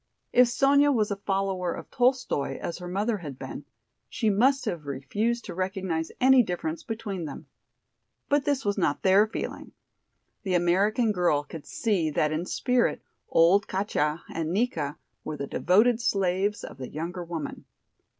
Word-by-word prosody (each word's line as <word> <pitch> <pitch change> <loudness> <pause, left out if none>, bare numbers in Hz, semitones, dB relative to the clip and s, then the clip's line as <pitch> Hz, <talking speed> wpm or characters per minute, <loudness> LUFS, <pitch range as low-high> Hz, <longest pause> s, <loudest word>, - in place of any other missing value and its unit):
If 250 0 +6
Sonya 280 +4 +4
was 215 -6 +1
a - - 0
follower 195 -2 -1
of - - -10
Tolstoi 250 - +1
as 170 - -5
her 180 - -7
mother 205 +4 -1
had 145 -6 -7
been, - - -7 0.4
she 220 -3 +1
must 260 +7 +3
have 170 -9 -4
refused 210 - -2
to - - -6
recognize 185 -3 -2
any 260 0 +6
difference 170 -6 -3
between 210 -6 -5
them. 145 - -8 0.8
But 285 -1 +2
this 275 -2 0
was 200 0 0
not 145 -5 0
their 195 +3 +5
feeling. 220 - -6 0.7
The 190 -3 -1
American 200 +6 +2
girl 175 -7 +2
could 145 +1 -10
see 190 -8 0
that 150 0 +1
in 160 +3 -2
spirit 250 -1 +1 0.3
old 185 +6 +4
Katja 170 -5 -1
and 165 -1 -2
Nika 170 -9 -1 0.3
were 155 - -5
the 140 - -3
devoted 220 - +3
slaves 195 -2 0
of - - -9
the 130 - -6
younger 175 +4 -5
woman. 165 -4 -6
190 Hz, 160 wpm, -27 LUFS, 165-225 Hz, 0.8 s, If